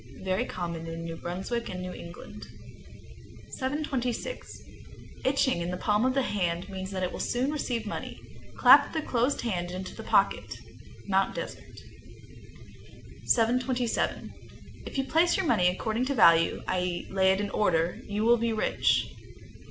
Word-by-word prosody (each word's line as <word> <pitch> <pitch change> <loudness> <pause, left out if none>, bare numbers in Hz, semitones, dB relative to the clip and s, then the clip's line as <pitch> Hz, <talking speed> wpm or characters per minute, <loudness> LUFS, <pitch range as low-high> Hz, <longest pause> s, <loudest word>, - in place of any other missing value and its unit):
Very 185 0 0
common 170 -2 -5
in 165 0 -6
New 165 0 -5
Brunswick 190 +9 -4
and 185 - -5
New 180 0 -5
England. 170 0 -10 1.0
726. 265 - -3 0.6
Itching 260 -8 +2
in 170 - -2
the 180 - -3
palm 210 +4 +1
of 260 - 0
the 270 - +2
hand 180 -4 -1
means 190 -1 -5
that 190 -1 -3
it 180 - -1
will - - -7
soon 255 +4 0
receive 245 -7 -2
money. 210 - -6 0.4
Clap - - +7
the 315 -2 -1
closed 250 +2 0
hand 180 -7 -2
into 185 +1 -6
the - - -7
pocket. - - +1 0.5
Mt. 195 -1 +1
Desert, - - -8 0.2
Me. - - -18
727. 245 +1 +1 0.5
If - - -6
you 270 - +2
place 330 +7 +3
your 380 - 0
money 180 - +3
according 220 +6 0
to 280 +1 -1
value, 165 -6 +5
i.e., 180 -1 -1
lay 190 0 +4
it 190 - +1
in 205 -1 -2
order, 170 -4 +1
you 205 +1 -2
will 240 +1 +6
be 230 0 0
rich. 215 - +1
205 Hz, 155 wpm, -28 LUFS, 180-250 Hz, 1.0 s, Clap